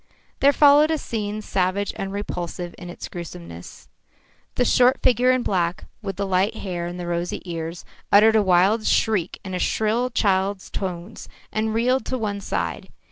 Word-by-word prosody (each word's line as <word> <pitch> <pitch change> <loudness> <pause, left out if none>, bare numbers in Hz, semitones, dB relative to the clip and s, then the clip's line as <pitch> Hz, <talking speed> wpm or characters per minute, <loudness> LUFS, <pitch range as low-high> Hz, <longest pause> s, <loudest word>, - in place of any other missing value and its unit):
There 280 - +6
followed 290 +1 +6
a 320 - +1
scene 215 -5 -4
savage 190 +1 -1
and 195 0 -4
repulsive 175 -3 -5
in 175 - -8
its 175 - -7
gruesomeness. 85 - -9 0.7
The 245 - +2
short 250 +2 +4
figure 250 0 +4
in 255 -1 +3
black, 175 -4 -1 0.2
with 195 -3 -4
the 200 - -2
light 190 +2 +1
hair 175 -3 -4
and 175 +1 -6
the 175 - -4
rosy 175 0 -2
ears, 165 -1 -5 0.3
uttered 220 +2 +6
a 220 - +5
wild 195 +4 +3
shriek 210 -6 +1
in 190 - -5
a 180 - -2
shrill 220 +6 +1
child's 195 -3 0
tones 180 -3 -6 0.2
and 220 0 -1
reeled 250 +2 +1
to 260 - -1
one 205 -3 -3
side. 90 - -3
200 Hz, 170 wpm, -23 LUFS, 175-225 Hz, 0.7 s, There